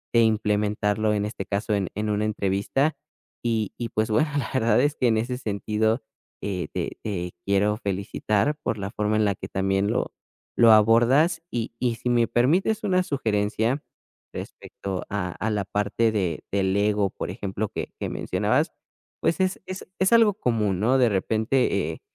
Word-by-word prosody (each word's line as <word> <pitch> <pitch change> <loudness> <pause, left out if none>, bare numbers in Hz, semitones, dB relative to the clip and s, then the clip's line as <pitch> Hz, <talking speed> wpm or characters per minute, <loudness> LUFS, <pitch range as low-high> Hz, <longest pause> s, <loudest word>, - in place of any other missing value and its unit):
de 115 - +7
implementarlo, 105 -1 +1
en 105 0 0
este 105 -2 -4
caso, 105 +2 -1
en 95 -3 -1
en 105 0 -2
una 105 +1 0
entrevista, 105 +8 0 0.5
y 110 -4 0
y, 120 - -3
pues, 110 0 -1
bueno, 150 +8 +3
la 125 -6 -2
verdad 115 -2 +3
es 145 +1 +2
que, 125 - +1
en 110 -1 +3
ese 125 +3 -2
sentido, 110 +1 0 0.4
eh, 95 -3 -2
te - - -3
te 90 -4 -3
quiero 105 +2 +2
felicitar 100 +6 -1
por 110 - -1
la 100 0 -4
forma 105 0 0
en 110 - +3
la 100 - +2
que - - -7
también 95 +1 0
lo - - -1 0.4
lo 115 -1 +7
abordas, 120 +10 +5
y 115 0 -3
y 120 -2 0
si 125 - -3
me 120 -1 +3
permites 185 - +2
una 185 -2 +3
sugerencia, 115 - 0 0.5
respecto 95 -2 -6
a 95 -3 -2
a 110 +6 -3
la 105 -2 -1
parte 105 +3 0
de 90 -7 -1
del 95 -1 +1
ego, 105 -1 +2
por - - -6
ejemplo, 100 +1 -3
que - - -5
que - - -3
mencionabas, - - 0 0.5
pues, 165 - +1
es 185 0 0
es 185 0 -6
es 190 +4 +3
algo 225 -4 +5
común, 105 - 0
¿no? 125 +5 +3
De 120 -2 +5
repente, 110 +6 +1 0.2
eh, - - -10
110 Hz, 175 wpm, -25 LUFS, 100-120 Hz, 0.5 s, de